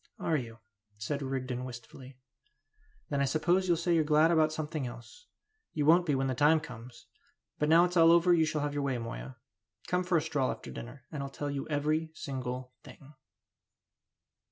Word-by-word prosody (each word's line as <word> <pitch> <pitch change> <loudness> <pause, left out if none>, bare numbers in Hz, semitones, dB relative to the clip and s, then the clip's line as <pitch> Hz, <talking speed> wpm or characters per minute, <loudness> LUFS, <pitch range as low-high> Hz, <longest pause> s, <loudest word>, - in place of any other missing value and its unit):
"Are 165 - 0
you?" 115 -5 -4 0.4
said 140 +7 -3
Rigden, 130 -2 -3
wistfully. 125 +1 -10 0.9
"Then 140 -1 0
I - - +3
suppose 175 +7 +1
you'll 170 -2 +3
say 170 +1 0
you're 165 -2 +3
glad 155 +2 +4
about 155 -2 +3
something 155 -3 -3
else. 120 - -12 0.5
You 150 -2 0
won't 170 +3 +5
be 145 - +2
when 135 0 0
the 130 - 0
time 150 +5 +4
comes! 120 -4 -11 0.5
But 150 - +1
now 165 +2 +7
it's 180 0 -4
all 165 0 +7
over 170 +1 +5
you 165 -2 +4
shall 155 -1 -2
have 145 0 -2
your 145 - -1
way, 135 -3 -1
Moya; 115 +2 -7 0.5
come 180 0 0
for 180 -1 +2
a - - +2
stroll 150 -5 0
after - - -6
dinner, 125 +2 -9
and 150 - -4
I'll 140 - -4
tell 145 +1 -4
you 140 -1 -4
every 155 +2 0
single 130 -2 -5
thing!" 145 +1 -14
145 Hz, 190 wpm, -30 LUFS, 130-160 Hz, 0.9 s, now